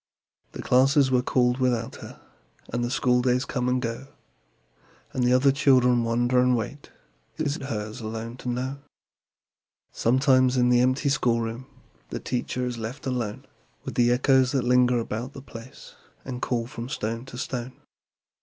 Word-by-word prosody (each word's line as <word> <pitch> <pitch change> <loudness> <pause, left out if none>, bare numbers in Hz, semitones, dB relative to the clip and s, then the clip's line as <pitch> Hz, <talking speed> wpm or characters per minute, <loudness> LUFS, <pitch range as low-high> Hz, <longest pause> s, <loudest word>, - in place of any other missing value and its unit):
The - - -7
classes 135 +2 +4
were 125 -1 +3
called 125 0 +1
without 120 -3 0
her, - - -11 0.5
And 120 0 0
the 120 - -1
schooldays 125 +1 +2
come 125 -1 -2
and 125 0 +1
go, 115 +2 -4 1.1
And 125 -1 +1
other 130 +2 +5
children 125 -3 +4
wonder 120 +2 +1
and 125 0 +3
wait 135 +6 -6 0.5
It 155 - -2
is 145 +1 -1
hers 110 -2 -5
alone 115 +2 -6
to 125 - -5
know. 130 +3 -3 1.1
Sometimes, 130 +1 +3
in 125 0 +3
the 120 0 +4
empty 130 +3 +1
schoolroom, 120 -2 0 0.4
The - - -4
teacher 125 0 -3
is 120 -2 -4
left 115 +6 -6
alone 120 -5 -3 0.4
With - - -6
the 120 -1 +3
echoes 130 +1 +3
that 135 -3 +1
linger 125 0 +3
about 115 +3 -4
the 135 - -9
place 115 -1 -12 0.3
And 125 -1 -6
call 120 -2 -1
from 120 0 -7
stone 115 -3 -3
to 130 -2 -10
stone. 125 -1 -4
125 Hz, 155 wpm, -25 LUFS, 120-130 Hz, 1.1 s, other